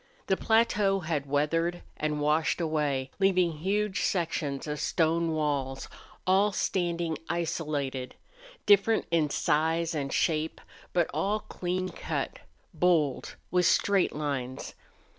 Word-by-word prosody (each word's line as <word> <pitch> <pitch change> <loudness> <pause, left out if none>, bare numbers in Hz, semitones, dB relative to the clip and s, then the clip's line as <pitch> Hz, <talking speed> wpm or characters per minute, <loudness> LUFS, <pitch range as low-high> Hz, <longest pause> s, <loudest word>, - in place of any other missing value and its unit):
The 190 - +2
plateau 210 -3 +2
had 155 -4 -2
weathered 165 +5 0
and 150 -1 -2
washed 150 +3 +1
away, 150 -5 -1
leaving 180 -5 +2
huge 200 +3 0
sections 160 -6 -1
of 150 -1 -4
stone 165 +2 +1
walls, 140 -4 -1 0.4
all 195 +3 +4
standing 170 -4 -1
isolated, 150 -6 -2 0.5
different 205 +2 +4
in 160 -3 +2
size 160 +3 +1
and 140 -3 -2
shape, 160 -1 0 0.3
but 175 -2 +2
all 200 +8 0
clean 185 0 -3
cut, - - -4 0.3
bold, 160 -7 +1 0.2
with 180 -1 +3
straight 200 -6 +2
lines. 135 -4 -3
165 Hz, 115 wpm, -28 LUFS, 150-180 Hz, 0.5 s, all